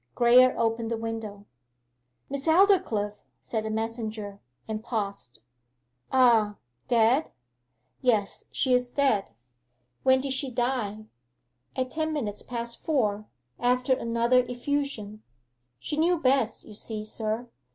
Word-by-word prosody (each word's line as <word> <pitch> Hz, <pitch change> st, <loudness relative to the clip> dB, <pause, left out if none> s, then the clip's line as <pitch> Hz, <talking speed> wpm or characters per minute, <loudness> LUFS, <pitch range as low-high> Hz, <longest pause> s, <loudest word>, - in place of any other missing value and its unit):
Graye 250 Hz, +1 st, +6 dB
opened 225 Hz, 0 st, 0 dB
the 230 Hz, -, -1 dB
window. 225 Hz, -3 st, -5 dB, 0.8 s
'Miss 280 Hz, +2 st, -4 dB
Aldclyffe....' 320 Hz, -, +3 dB, 0.2 s
said 220 Hz, -2 st, -3 dB
the -, -, -2 dB
messenger, 220 Hz, -2 st, -4 dB, 0.3 s
and 220 Hz, 0 st, -4 dB
paused. 200 Hz, -, -4 dB, 0.7 s
'Ah 230 Hz, -5 st, +4 dB, 0.3 s
dead?' 240 Hz, +5 st, +3 dB, 0.7 s
'Yes 220 Hz, -6 st, +1 dB
she 260 Hz, -, +1 dB
is 250 Hz, 0 st, +2 dB
dead.' 255 Hz, -7 st, +1 dB, 0.7 s
'When 260 Hz, 0 st, +4 dB
did 270 Hz, 0 st, -2 dB
she 265 Hz, 0 st, -2 dB
die?' 240 Hz, -4 st, -2 dB, 0.7 s
'At 255 Hz, -1 st, -2 dB
ten 315 Hz, 0 st, -1 dB
minutes 215 Hz, -9 st, -3 dB
past 235 Hz, -1 st, -6 dB
four, 215 Hz, -9 st, 0 dB, 0.3 s
after 250 Hz, +2 st, +2 dB
another 235 Hz, +1 st, +2 dB
effusion. 245 Hz, -5 st, -3 dB, 0.6 s
She 295 Hz, -, -5 dB
knew 345 Hz, +3 st, +3 dB
best, 260 Hz, -6 st, +1 dB
you 215 Hz, -, -11 dB
see, 215 Hz, 0 st, -6 dB
sir. 220 Hz, +2 st, -3 dB
235 Hz, 120 wpm, -27 LUFS, 215-260 Hz, 0.8 s, Graye